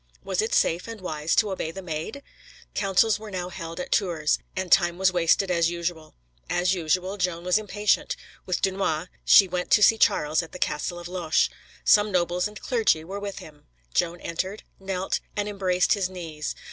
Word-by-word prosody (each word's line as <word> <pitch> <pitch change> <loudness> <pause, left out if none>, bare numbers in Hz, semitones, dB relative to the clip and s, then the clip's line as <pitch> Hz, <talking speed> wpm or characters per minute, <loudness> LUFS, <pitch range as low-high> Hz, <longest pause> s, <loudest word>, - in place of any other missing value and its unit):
Was - - 0
it 445 +2 -2
safe 170 +5 +1
and 230 -1 -7
wise 155 -3 -1
to 210 -3 +3
obey 185 -4 -3
the 190 +4 -8
Maid? 165 - -5 0.5
Councils 205 +2 +2
were 215 0 -9
now 180 -2 -4
held 165 -2 -7
at 180 - -5
Tours, 165 -6 +1 0.2
and 185 -1 -3
time 175 -2 +4
was 185 -1 +3
wasted 180 +2 +2
as 170 -2 +3
usual. 170 -2 -4 0.3
As 180 +1 +2
usual, 185 +3 -1
Joan 180 -2 -1
was 180 +3 +3
impatient. 210 0 0 0.3
With 185 - -1
Dunois, 185 -3 0
she 195 - +7
went 180 0 -3
to 210 - +5
see 225 +2 +6
Charles 150 +2 +3
at 165 - -11
the - - -6
castle 175 0 -2
of 175 0 -7
Loches. 175 -3 +1 0.3
Some 210 0 +5
nobles 180 +1 +1
and 210 0 -11
clergy 225 -10 +1
were 195 +5 -6
with 200 -1 -5
him; 150 -2 -12 0.3
Joan 175 +1 0
entered, 185 +5 -4 0.2
knelt, 190 -1 -2 0.2
and 205 0 -1
embraced 185 -3 +1
his 195 -3 -1
knees. 165 -5 -6
180 Hz, 185 wpm, -25 LUFS, 170-195 Hz, 0.5 s, she